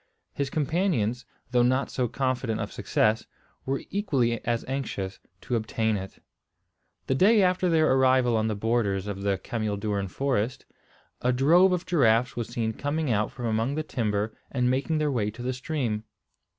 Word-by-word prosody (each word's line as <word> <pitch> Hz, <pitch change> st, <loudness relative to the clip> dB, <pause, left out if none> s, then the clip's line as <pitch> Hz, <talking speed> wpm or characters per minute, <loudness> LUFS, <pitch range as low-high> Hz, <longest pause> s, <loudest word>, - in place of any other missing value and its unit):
His 140 Hz, -1 st, -2 dB
companions, 145 Hz, -, 0 dB, 0.3 s
though 125 Hz, -1 st, +4 dB
not 130 Hz, +3 st, +2 dB
so 125 Hz, -2 st, 0 dB
confident 130 Hz, -3 st, -1 dB
of -, -, -4 dB
success, 110 Hz, +1 st, +1 dB, 0.4 s
were 135 Hz, 0 st, -1 dB
equally 135 Hz, -, 0 dB
as 120 Hz, -1 st, -1 dB
anxious 105 Hz, -8 st, -4 dB, 0.2 s
to 125 Hz, -, -2 dB
obtain 110 Hz, -1 st, 0 dB
it. 95 Hz, -1 st, -6 dB, 0.9 s
The -, -, +1 dB
day 200 Hz, +8 st, +5 dB
after 180 Hz, 0 st, +2 dB
their 155 Hz, -4 st, +4 dB
arrival 130 Hz, -2 st, +4 dB
on 110 Hz, 0 st, +1 dB
the 110 Hz, -, -1 dB
borders 100 Hz, -3 st, 0 dB
of 100 Hz, -1 st, -5 dB
the 100 Hz, -1 st, +1 dB
cameel 110 Hz, -4 st, -3 dB
doorn 100 Hz, -1 st, -1 dB
forest, 125 Hz, +1 st, -1 dB, 0.6 s
a 125 Hz, -, +2 dB
drove 165 Hz, +9 st, +5 dB
of 180 Hz, -1 st, -1 dB
giraffes 125 Hz, -9 st, +3 dB
was 120 Hz, -2 st, -3 dB
seen 115 Hz, -2 st, -2 dB
coming 145 Hz, +2 st, -1 dB
out 105 Hz, -1 st, +1 dB
from 125 Hz, -, -6 dB
among 115 Hz, +4 st, 0 dB
the 155 Hz, -, -1 dB
timber 110 Hz, -6 st, -2 dB
and 125 Hz, -2 st, +1 dB
making 140 Hz, +5 st, 0 dB
their 150 Hz, -1 st, +1 dB
way 110 Hz, -5 st, 0 dB
to 115 Hz, +3 st, -8 dB
the 130 Hz, +1 st, -1 dB
stream. 125 Hz, -5 st, -2 dB
125 Hz, 170 wpm, -27 LUFS, 110-140 Hz, 0.9 s, day